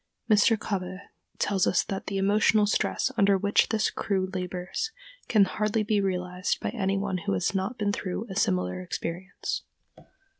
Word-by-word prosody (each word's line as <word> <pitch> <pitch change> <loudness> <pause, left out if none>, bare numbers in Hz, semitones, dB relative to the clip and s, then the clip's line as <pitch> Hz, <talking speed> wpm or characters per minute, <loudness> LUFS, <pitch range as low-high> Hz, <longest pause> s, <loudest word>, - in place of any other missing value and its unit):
Mr. 220 +1 +5
Kobbé 185 -3 -3 0.4
tells 195 -3 +1
us - - +3
that 195 - -5
the 200 - -2
emotional 210 +2 +4
stress 205 - +1
under 200 -2 +5
which 200 +2 +2
this 220 -1 +1
crew 190 -2 -1
labors 185 - -3 0.4
can 210 -4 +5
hardly 215 +3 0
be 210 -1 +1
realized 180 -1 -1
by - - -2
any 195 -4 0
one 195 -2 -1
who 165 - -2
has 95 - 0
not 195 +5 -2
been 205 -2 0
through 195 +2 -3
a 190 - -7
similar 90 - 0
experience. 170 - -4
195 Hz, 160 wpm, -27 LUFS, 185-210 Hz, 0.4 s, Mr